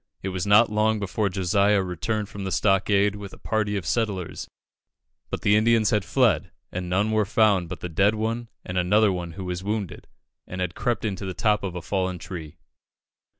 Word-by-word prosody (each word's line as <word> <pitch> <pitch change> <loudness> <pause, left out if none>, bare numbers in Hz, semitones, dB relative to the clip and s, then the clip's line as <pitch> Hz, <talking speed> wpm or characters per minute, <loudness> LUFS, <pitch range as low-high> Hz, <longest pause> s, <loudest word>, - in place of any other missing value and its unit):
It 95 - -2
was 90 0 -3
not 105 +2 +6
long 110 +1 +2
before 100 +1 -1
Josiah 100 +2 +2
returned 100 +4 -2
from 100 0 -7
the 95 - -3
stockade 100 +1 +2
with 100 -1 -8
a - - -11
party 105 -2 -1
of 95 - -5
settlers; 100 -2 -2 0.8
but - - -4
the 100 - +4
Indians 110 -1 +3
had 105 -2 +2
fled, 115 - +2 0.2
and 90 0 -4
none 100 +4 +1
were 110 -1 +3
found 100 -4 +2
but 90 - -7
the - - -3
dead 95 +6 +2
one, 115 +2 -2 0.2
and 90 0 -1
another 105 +4 +3
who 90 +1 -5
was 90 0 -4
wounded, 105 -2 -4 0.4
and 95 - -6
had 90 -2 -2
crept 120 +1 -1
into 100 -2 -3
the 95 - -5
top 105 -2 +2
of 95 -3 -4
a 90 - -5
fallen 95 +3 -1
tree. 80 -3 -8
100 Hz, 195 wpm, -25 LUFS, 90-105 Hz, 0.8 s, not